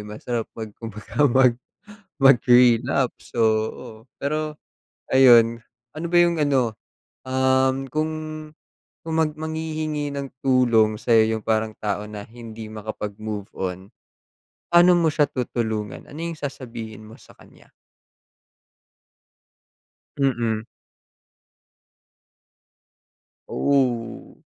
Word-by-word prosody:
masarap 110 Hz, +3 st, -5 dB
mag 110 Hz, -2 st, -6 dB
kumbaga 115 Hz, +6 st, -1 dB
mag 130 Hz, 0 st, +5 dB, 0.6 s
mag-relapse. 125 Hz, -1 st, +3 dB
So 115 Hz, -, +1 dB, 0.3 s
oo, -, -, -10 dB, 0.3 s
pero 155 Hz, +1 st, -3 dB, 0.5 s
ayon, 120 Hz, -3 st, +6 dB, 0.4 s
ano 165 Hz, -, -4 dB
ba 175 Hz, +1 st, +2 dB
yung 170 Hz, -1 st, +2 dB
ano, 130 Hz, -7 st, +1 dB, 0.5 s
um, 130 Hz, +1 st, +1 dB
kung 155 Hz, +4 st, -1 dB, 0.9 s
kung 160 Hz, 0 st, -2 dB
mag 155 Hz, -1 st, +1 dB
manghihingi 155 Hz, -2 st, -3 dB
ng 140 Hz, -1 st, -5 dB
tulong 120 Hz, -5 st, +3 dB
sa'yo 110 Hz, 0 st, +3 dB
yung 110 Hz, -, -10 dB
parang 110 Hz, -1 st, 0 dB
tao 105 Hz, 0 st, -3 dB
na 105 Hz, -1 st, -8 dB
hindi 110 Hz, -1 st, -10 dB
makapag-move 105 Hz, -1 st, -6 dB
on. 95 Hz, +2 st, -5 dB, 0.8 s
Pa'no 175 Hz, +1 st, +7 dB
mo 170 Hz, -, +2 dB
siya 145 Hz, -2 st, +2 dB
tutulungan? 110 Hz, -5 st, -4 dB
Ano 145 Hz, -, -10 dB
yung 170 Hz, +1 st, -4 dB
sasabihin 115 Hz, -7 st, -7 dB
mo 110 Hz, -, -13 dB
sa -, -, -18 dB
kanya? -, -, -20 dB, 2.5 s
Mm. 120 Hz, -5 st, 0 dB, 2.9 s
Oh. 125 Hz, -5 st, -1 dB
125 Hz, 100 wpm, -23 LUFS, 110-145 Hz, 2.9 s, Pa'no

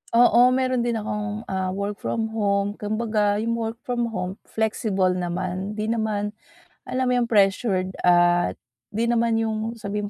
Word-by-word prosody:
Oo, 245 Hz, +1 st, +6 dB
meron 255 Hz, -1 st, +1 dB
din 235 Hz, -, 0 dB
akong, 210 Hz, 0 st, -3 dB
ah, 190 Hz, -1 st, -1 dB
work 200 Hz, +1 st, -3 dB
from 220 Hz, -1 st, -2 dB
home, 200 Hz, -2 st, +1 dB
kumbaga 215 Hz, -1 st, 0 dB
yung 230 Hz, 0 st, -1 dB
work 225 Hz, 0 st, -3 dB
from 240 Hz, -1 st, -1 dB
home 185 Hz, -3 st, -4 dB
flexible 215 Hz, -4 st, 0 dB
naman, 185 Hz, +2 st, -3 dB
di 215 Hz, +1 st, -1 dB
naman 215 Hz, -2 st, -1 dB, 0.6 s
alam 260 Hz, 0 st, 0 dB
mo -, -, +3 dB
yung 235 Hz, -, 0 dB
pressured 195 Hz, -2 st, +2 dB
at 175 Hz, 0 st, +4 dB, 0.4 s
di 225 Hz, +2 st, -1 dB
naman 235 Hz, -1 st, +2 dB
yung 220 Hz, +1 st, -2 dB
sabihin 210 Hz, -1 st, -4 dB
215 Hz, 155 wpm, -24 LUFS, 195-230 Hz, 0.6 s, Oo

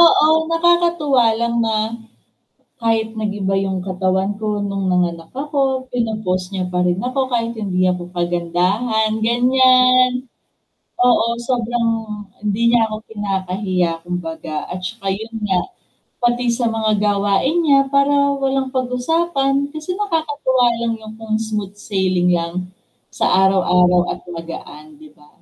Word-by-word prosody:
Oo, 335 Hz, -2 st, +7 dB, 0.2 s
nakakatuwa 330 Hz, -6 st, +3 dB
lang 235 Hz, 0 st, 0 dB
na 220 Hz, -1 st, 0 dB, 1.1 s
kahit 225 Hz, -1 st, +1 dB
nag-iba 205 Hz, -2 st, -2 dB
yung 190 Hz, -1 st, -2 dB
katawan 190 Hz, +1 st, 0 dB
ko 215 Hz, -, -2 dB, 0.2 s
nung 195 Hz, -1 st, -3 dB
nanganak 170 Hz, -2 st, 0 dB
ako 290 Hz, -1 st, -3 dB, 0.3 s
pino-post 215 Hz, -6 st, -1 dB
niya 190 Hz, -2 st, -3 dB
pa 180 Hz, -, +1 dB
rin 175 Hz, 0 st, +1 dB
ako 255 Hz, +2 st, -2 dB
kahit 230 Hz, 0 st, 0 dB
hindi 185 Hz, -3 st, -1 dB
ako 180 Hz, -1 st, -4 dB
kagandahan, 180 Hz, +6 st, 0 dB
ganyan. 255 Hz, +1 st, +5 dB, 1.0 s
Oo, 240 Hz, -2 st, +4 dB, 0.2 s
sobrang 240 Hz, -1 st, 0 dB, 0.5 s
hindi 210 Hz, +2 st, -1 dB
niya 240 Hz, -, +4 dB
ako 215 Hz, -1 st, -5 dB
kinakahiya 190 Hz, -3 st, -1 dB, 0.2 s
kumbaga, 165 Hz, -3 st, -5 dB, 0.2 s
at 180 Hz, -, -4 dB
saka 195 Hz, +2 st, -7 dB
yun 225 Hz, +1 st, -9 dB
nga, 190 Hz, -2 st, +2 dB, 0.6 s
pati 240 Hz, +1 st, +1 dB
sa 240 Hz, -, +1 dB
mga 220 Hz, -1 st, +1 dB
gawain 205 Hz, -, +1 dB
niya 280 Hz, -3 st, +5 dB
para 280 Hz, +1 st, +4 dB, 0.3 s
walang 270 Hz, 0 st, 0 dB
pag-usapan 275 Hz, +3 st, 0 dB, 0.2 s
kasi 315 Hz, +4 st, -5 dB
nakakatuwa 295 Hz, -10 st, 0 dB, 0.2 s
lang 230 Hz, -, 0 dB
yung 220 Hz, 0 st, -10 dB
kung 220 Hz, -1 st, -2 dB
smooth 210 Hz, -2 st, -4 dB
sailing 185 Hz, -3 st, 0 dB
lang 170 Hz, 0 st, -3 dB, 0.5 s
sa -, -, -3 dB, 0.2 s
araw-araw 180 Hz, -2 st, +4 dB
at -, -, -8 dB
magaan, 155 Hz, -3 st, -9 dB
'di 155 Hz, -1 st, -15 dB
ba? 150 Hz, 0 st, -21 dB
215 Hz, 130 wpm, -19 LUFS, 185-255 Hz, 1.1 s, Oo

